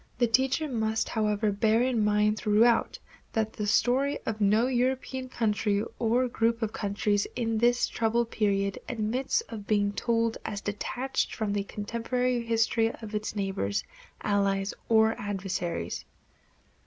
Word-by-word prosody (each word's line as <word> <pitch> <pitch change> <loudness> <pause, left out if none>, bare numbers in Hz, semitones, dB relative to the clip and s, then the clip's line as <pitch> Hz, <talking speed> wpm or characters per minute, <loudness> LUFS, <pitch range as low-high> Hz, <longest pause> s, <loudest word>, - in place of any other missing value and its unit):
The 240 - +3
teacher 265 +6 +2
must, 220 -4 -1
however, 210 -1 +1
bear 220 +3 +2
in 245 -4 +1
mind 210 0 +3
throughout 225 +2 +3 0.4
that 220 -1 0
"the 210 - -3
story 265 +6 +2
of 220 -1 -3
no 210 +3 +4
European 255 +1 -1
country 210 -3 0 0.2
or 240 +2 +2
group 230 -1 0
of 220 - -2
countries 205 0 0
in 225 -2 0
this 240 +1 +3
troubled 230 +1 0
period 200 -2 0
admits 245 - 0
of 220 - -9
being 205 -1 +2
told 230 0 0
as 205 -2 -4
detached 245 +6 -2
from 215 -2 -1
the 200 -1 -1
contemporary 235 +4 -1
history 225 0 +2
of 220 -2 -9
its 210 0 -3
neighbors, 190 - -1 0.4
allies, 200 -1 +1 0.2
or 220 0 +5
adversaries." 185 - -3
220 Hz, 140 wpm, -28 LUFS, 205-235 Hz, 0.4 s, or